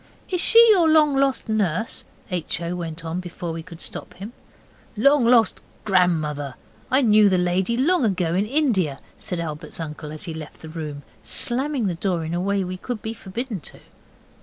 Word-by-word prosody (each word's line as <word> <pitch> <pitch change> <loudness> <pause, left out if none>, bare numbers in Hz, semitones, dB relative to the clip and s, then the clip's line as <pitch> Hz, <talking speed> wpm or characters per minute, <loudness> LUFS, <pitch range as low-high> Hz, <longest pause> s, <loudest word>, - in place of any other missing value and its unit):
'Is 360 -2 0
she 465 0 +7
your 350 -6 +5
long 305 -2 +5
lost 270 -2 +1
nurse?' 215 -1 -1 0.3
H. 175 -2 -2
O. 170 +1 -3
went 165 -1 -6
on, 165 +2 -3
before 175 -1 -6
we 165 - -5
could 165 0 -12
stop - - -7
him. 205 +5 -8 0.6
'Long 275 +3 +4
lost 235 -2 +4 0.2
grandmother! 155 -8 +1 0.3
I 265 +2 +4
knew 215 -2 +6
the 185 - +2
lady 180 +5 +1
long 320 +4 +3
ago 180 -6 +1
in 195 +4 +1
India,' 215 - +1 0.2
said 180 - -4
Albert's 155 -1 -5
uncle, 150 -1 -6
as 155 - -7
he 165 - -5
left 155 -1 -9
the 160 - -8
room, 150 -3 -6 0.2
slamming 250 - 0
the 185 - 0
door 170 -1 -1
in 160 - -4
a 175 - -1
way 200 +1 0
we 185 0 -5
should 245 -4 -4
be 220 - -3
forbidden 225 +1 -5
to. - - -11
185 Hz, 185 wpm, -23 LUFS, 165-240 Hz, 0.6 s, she